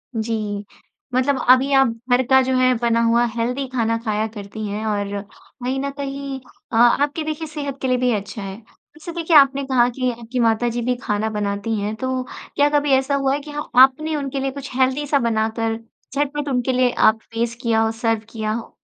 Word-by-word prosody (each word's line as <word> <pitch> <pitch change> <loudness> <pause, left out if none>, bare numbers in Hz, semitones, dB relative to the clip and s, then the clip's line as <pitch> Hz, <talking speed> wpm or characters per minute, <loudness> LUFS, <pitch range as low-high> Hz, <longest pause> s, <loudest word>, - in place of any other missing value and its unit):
जी। 215 -2 -2 0.5
मतलब 260 +2 +2
अभी 260 +2 +6
आप 270 -1 +5 0.2
घर 245 +1 +4
का 265 0 +6
जो 260 0 0
है, 255 0 +4
बना 230 0 +1
हुआ 230 +1 +3
हेल्दी 250 +4 -1
खाना 230 -2 +1
खाया 215 0 0
करती 215 0 -7
हैं 210 +2 -4
और 205 -1 -2
कहीं 250 +5 -6
न 280 - -2
कहीं 275 -1 -4 0.3
अ, - - -3
आपकी, 280 +7 +3
देखिए, 310 +1 -4
सेहत 285 -3 -5
के 265 - -1
लिए 255 0 +2
भी 250 0 +1
अच्छा 205 +1 -4
है। 195 -1 -6
वैसे 305 +8 -13
देखिए, 335 -1 0
आपने 275 -1 +5
कहा 255 -3 +3
कि 255 0 -1
आपकी 235 +1 -5
माता 230 0 +2
जी 240 +1 -3
भी 250 0 +1
खाना 210 +1 -1
बनाती 210 +1 -2
हैं, 205 +2 -2
तो 260 +2 -2 0.3
क्या 290 0 +4
कभी 290 -1 +1
ऐसा 265 +1 +2
हुआ 275 -1 +1
है 285 - -1
कि 300 +1 -10
हाँ, 295 0 -5
आपने 270 +5 +5
उनके 275 -2 -3
लिए 270 0 -1
कुछ 275 -1 -8
हेल्दी 265 +3 +1
सा 280 0 +2
बनाकर, 225 -1 0 0.4
झटपट 290 +1 -1
उनके 255 0 0
लिए 250 0 +3
आप 220 -2 +3
पेश 230 +1 -2
किया 230 -3 +2
हो, 225 0 +1
सर्व 225 0 0
किया 215 -2 -3
हो? 230 +1 -6
250 Hz, 205 wpm, -21 LUFS, 225-275 Hz, 0.5 s, अभी